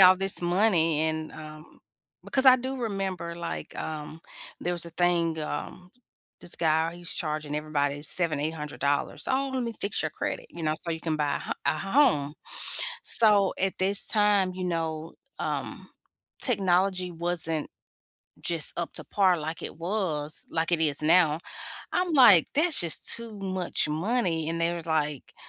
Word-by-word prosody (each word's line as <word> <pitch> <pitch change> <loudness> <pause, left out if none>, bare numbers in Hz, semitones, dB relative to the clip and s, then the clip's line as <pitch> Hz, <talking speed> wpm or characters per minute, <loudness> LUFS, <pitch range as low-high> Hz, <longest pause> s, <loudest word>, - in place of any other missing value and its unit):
all 185 0 +8
this 195 -1 0
money 175 -4 +2
and, 160 0 -2
um 155 0 -12 0.4
because 265 - +2
I 255 0 +9
do 260 +2 -4
remember, 190 -6 -3
like, 170 -1 -6
um, 155 0 -6 0.4
there 175 - -1
was 175 -1 +3
a 170 - -7
thing, 170 -1 +1
um, 180 +4 -6 0.5
this 175 - -3
guy, 160 0 +1
he's 175 -1 -5
charging 155 -2 -3
everybody 145 -1 -1
7, 155 -1 +2
$800, 150 - -2
"Oh, 270 +1 0
let 255 - 0
me 230 -1 -3
fix 200 -4 -1
your 155 - -2
credit, - - -4
you 170 - -9
know, 155 0 +1
so 170 - -5
you 160 - -2
can 160 -1 -2
buy 145 -1 0
a - - -8
h - - +3
a 155 +2 +1
home." 195 - +2 0.7
So, 205 -4 +5
at 190 0 0
this 195 +2 +3
time, 205 -3 +3
you 185 - -4
know, 165 -2 -3 0.3
um, - - -4 0.5
technology 185 -4 +1
wasn't 165 -2 0 0.7
just 165 -3 +1
up 170 - -4
to - - -4
par 190 -3 +2
like 160 +2 -5
it - - -6
was 165 -5 -3
like 165 +1 -1
it 165 - +3
is 150 -2 +2
now. 160 -1 +4 0.5
I'm 360 -2 0
like, 210 - +7
"That's 315 +1 +3
just 170 -2 +1
too 230 -3 -9
much 185 -4 -1
money" 165 -1 0
and 165 - -3
they 170 +1 +1
was 170 -1 -7
like, 150 -3 -2
170 Hz, 165 wpm, -27 LUFS, 155-195 Hz, 0.7 s, I